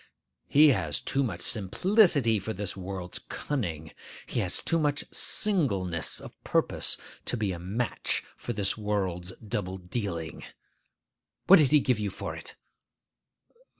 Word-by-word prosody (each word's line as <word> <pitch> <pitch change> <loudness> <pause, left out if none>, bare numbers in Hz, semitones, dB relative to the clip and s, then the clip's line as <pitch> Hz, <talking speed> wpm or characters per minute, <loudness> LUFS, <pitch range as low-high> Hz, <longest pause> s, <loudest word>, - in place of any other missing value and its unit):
He 150 +2 +7
has 80 - +1
too 135 - -1
much 95 -10 -2
simplicity 135 - +3
for 110 +3 -4
this 100 -2 -3
world's 95 -2 -4
cunning. 85 - -4 0.3
He - - -2
has 90 -5 -1
too 165 - +1
much 145 -2 +1
singleness 100 - -1
of - - -12
purpose - - +2 0.3
to 125 - 0
be 105 -3 0
a 85 - -5
match 100 +6 -1
for - - -5
this 100 -2 +1
world's 95 -4 -2 0.2
double 100 -4 -2
dealing. 90 -3 -4 1.0
What 195 -1 +9
did 145 -4 +4
he 150 - +6
give 125 -5 +1
you 105 -1 -1
for - - -5
it? - - -7
105 Hz, 140 wpm, -28 LUFS, 90-130 Hz, 1.0 s, What